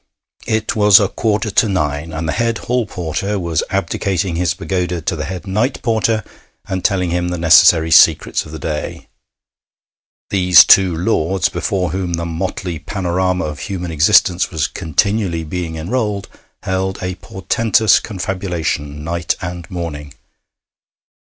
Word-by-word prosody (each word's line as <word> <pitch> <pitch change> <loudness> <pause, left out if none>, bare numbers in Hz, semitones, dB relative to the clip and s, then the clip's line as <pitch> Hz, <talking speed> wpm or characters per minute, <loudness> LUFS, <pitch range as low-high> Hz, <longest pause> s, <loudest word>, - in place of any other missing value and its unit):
It 110 0 -1
was 105 -1 +6
a 100 - +2
quarter 105 +1 -1
to 110 - +2
nine, 75 -3 -2
and 80 0 -4
the - - 0
head 115 -1 0
hall 125 -2 -2
porter 95 +4 -3
was 85 -4 -1
abdicating 95 -2 -1
his 85 -1 0
pagoda 90 -2 -2
to 85 +3 -2
the 75 -2 -4
head 95 +3 -6
night 110 +7 -1
porter, 110 -2 +1 0.4
and 95 -2 -4
telling 90 -3 0
him 90 0 -1
the 90 - -3
necessary 80 0 +5
secrets - - +4
of 75 - -12
the 80 - -6
day. 75 0 -5 1.2
These 90 -2 +7
two 95 -4 +5
lords, 95 0 0
before 95 -3 -2
whom 90 -1 -3
the 85 0 -2
motley 85 0 -4
panorama 90 +1 -1
of 75 -2 -6
human 90 +4 -5
existence 90 +3 +3
was 80 -5 -1
continually 90 +1 -1
being 80 0 -5
enrolled, 100 +4 -2 0.4
held 95 0 -2
a 90 0 -2
portentous 110 +3 +1
confabulation 85 -7 -4
night 85 +1 -2
and 90 -2 -7
morning. 75 -6 -6
90 Hz, 145 wpm, -17 LUFS, 80-100 Hz, 1.2 s, These